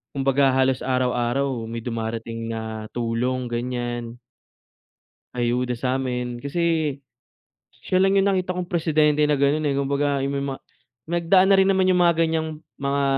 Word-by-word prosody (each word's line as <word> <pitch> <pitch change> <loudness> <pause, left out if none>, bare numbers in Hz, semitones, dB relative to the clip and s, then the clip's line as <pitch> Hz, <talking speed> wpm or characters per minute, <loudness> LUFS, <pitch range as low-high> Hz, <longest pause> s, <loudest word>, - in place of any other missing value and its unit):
kumbaga, 135 0 +2
halos 130 0 +2
araw-araw 125 -1 -1
may 115 0 -6
dumarating 115 -1 -4
na 110 -1 -5
tulong, 120 +2 -1
ganiyan 120 -1 -3 1.2
ayuda 125 +1 0
sa'min 125 -1 -2
kasi 160 +1 0 0.9
siya 185 - +1
lang 195 +1 +3
'yong 195 0 +4
nakita 185 -1 0
kong 180 -1 -3
presidente 155 -3 +2
na 150 0 +2
ganun, 145 +2 +2
eh. 145 - +1
Kumbaga, 140 0 0
ay 135 - -1
may 140 0 -2
ma 135 -1 -3 0.5
nagdaan 175 +3 +3
na 195 - +7
rin 190 0 +4
naman 190 -1 +2
yung 180 - +3
mga 170 0 +4
ganiyang 160 -1 0 0.3
mga 140 0 0
135 Hz, 145 wpm, -23 LUFS, 120-160 Hz, 1.2 s, na